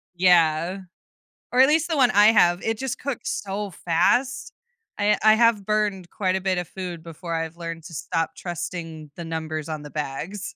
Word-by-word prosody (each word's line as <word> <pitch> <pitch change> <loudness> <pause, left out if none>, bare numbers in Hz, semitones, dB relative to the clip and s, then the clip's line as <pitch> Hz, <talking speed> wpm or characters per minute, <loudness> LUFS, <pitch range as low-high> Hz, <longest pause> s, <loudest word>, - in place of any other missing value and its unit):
Yeah. 175 0 +3 0.7
Or 250 - +3
at 265 - +7
least 320 +2 +2
the 320 - 0
one 250 -3 +5
I 205 -2 +6
have. 175 -5 +5
It 225 0 -1
just 265 -2 -3
cooks 275 -3 -4
so 200 0 -4
fast. 240 +11 0 0.5
I 205 +1 +3
I 215 0 +8
have 230 -3 +3
burned 205 -4 -1
quite 185 -2 0
a - - -2
bit 190 -1 0
of 175 -2 -4
food 180 -4 -6
before 165 +1 -6
I've 165 0 -3
learned 165 -1 -6
to 165 - -10
stop 165 +2 -2
trusting 165 -3 -6
the 170 - -6
numbers 160 -1 -4
on 155 -1 -4
the 150 - -10
bags. 155 +8 -5
180 Hz, 190 wpm, -24 LUFS, 165-210 Hz, 0.7 s, I